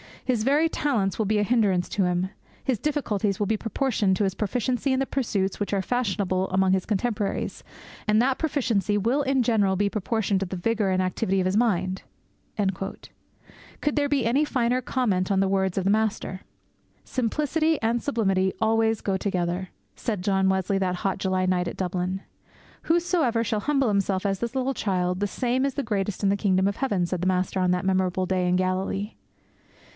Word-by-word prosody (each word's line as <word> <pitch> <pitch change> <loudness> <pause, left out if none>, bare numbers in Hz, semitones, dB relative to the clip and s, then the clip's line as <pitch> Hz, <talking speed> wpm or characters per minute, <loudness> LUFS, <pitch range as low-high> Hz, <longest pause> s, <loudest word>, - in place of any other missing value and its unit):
His 245 -4 +1
very 290 +6 +3
talents 230 -13 0
will 220 - +2
be 215 +1 +1
a - - +2
hindrance 205 -6 +2
to 195 - +1
him. 180 +1 0 0.3
His 255 -5 0
difficulties 215 -9 -1
will 205 - 0
be 220 +2 0
proportioned 225 -4 0
to 205 - 0
his 190 -2 +1
proficiency 245 +6 -1
in 260 - +1
the 270 - +1
pursuits 205 -9 -1
which 205 0 -2
are 195 - +2
fashionable 195 -5 -1
among 190 0 +2
his 190 -1 +1
contemporaries; 210 -1 -2 0.4
and 215 0 +4
that 260 +2 +2
proficiency 230 - 0
will 235 +8 +1
in 270 -1 +2
general 205 -5 +2
be 200 +1 +1
proportioned 210 -1 0
to 195 - -1
the 185 - -5
vigour 210 +2 0
and 185 0 +2
activity 190 +1 0
of 185 - +1
his 185 +2 +1
mind.' 190 -5 +1 1.8
Could 295 - 0
there 290 -1 +2
be 280 -4 +1
any 260 +6 +3
finer 250 -3 +1
comment 205 -8 0
on 195 - +3
the 195 0 +2
words 190 -1 0
of 190 - +1
the 195 - +2
Master? 210 -3 -1 0.6
'Simplicity 300 +5 0
and 230 +1 +1
sublimity 195 -8 +1
always 225 0 +2
go 195 -2 0
together!' 180 -1 -2 0.3
said 210 -6 -3
John 190 -1 +2
Wesley 190 +1 +1
that 185 -1 0
hot 195 +1 -1
July 185 -1 0
night 180 -1 +1
at - - -5
Dublin. 185 +1 -2 0.6
'Whosoever 325 -9 +2
shall 215 -1 -1
humble 275 0 +1
himself 200 -1 0
as 195 -1 0
this 235 +3 -3
little 265 +1 0
child, 180 -5 -1
the 205 - 0
same 250 +5 0
is 275 -2 -2
the 280 - -1
greatest 205 -3 -2
in 200 - +4
the 200 - +2
kingdom 190 -1 +2
of 200 - -2
heaven!' 205 -10 0
said 175 0 -3
the 185 - 0
Master 185 +1 0
on 185 -1 +2
that 180 0 0
memorable 185 -1 +1
day 185 -1 0
in 180 - +2
Galilee. 185 +3 -1
200 Hz, 190 wpm, -25 LUFS, 190-240 Hz, 1.8 s, and